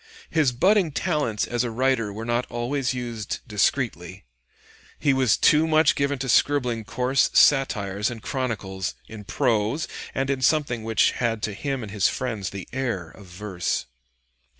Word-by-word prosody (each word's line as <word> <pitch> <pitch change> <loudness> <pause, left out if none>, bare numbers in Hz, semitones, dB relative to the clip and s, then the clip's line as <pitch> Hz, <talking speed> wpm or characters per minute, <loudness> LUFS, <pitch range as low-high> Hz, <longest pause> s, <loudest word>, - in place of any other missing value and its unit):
His 155 -6 +3
budding 180 - +2
talents 120 -9 0
as 120 0 -1
a 120 - -2
writer 120 -2 0
were 110 +3 -6
not 120 +1 0
always 125 +3 -1
used 120 -4 -4
discreetly. 100 - -1 0.7
He 145 -2 +2
was 130 -4 +3
too 155 +1 +4
much 155 -1 +4
given 140 0 0
to 130 +1 -4
scribbling 125 -4 +2
coarse 125 +4 +1
satires 105 -8 +3
and 120 -2 -7
chronicles, 105 -8 -3
in 110 -2 -10
prose, 115 +4 0 0.3
and 135 +1 0
in 135 -1 -2
something 130 -5 +1
which 110 0 +3
had 115 -3 -2
to 105 - -1
him 135 +3 -3
and 105 - -7
his 100 -2 +2
friends 110 -7 -3
the 95 -2 -8
air 115 - -3
of 100 +4 -15
verse. 90 -6 -3
120 Hz, 155 wpm, -24 LUFS, 105-135 Hz, 0.7 s, too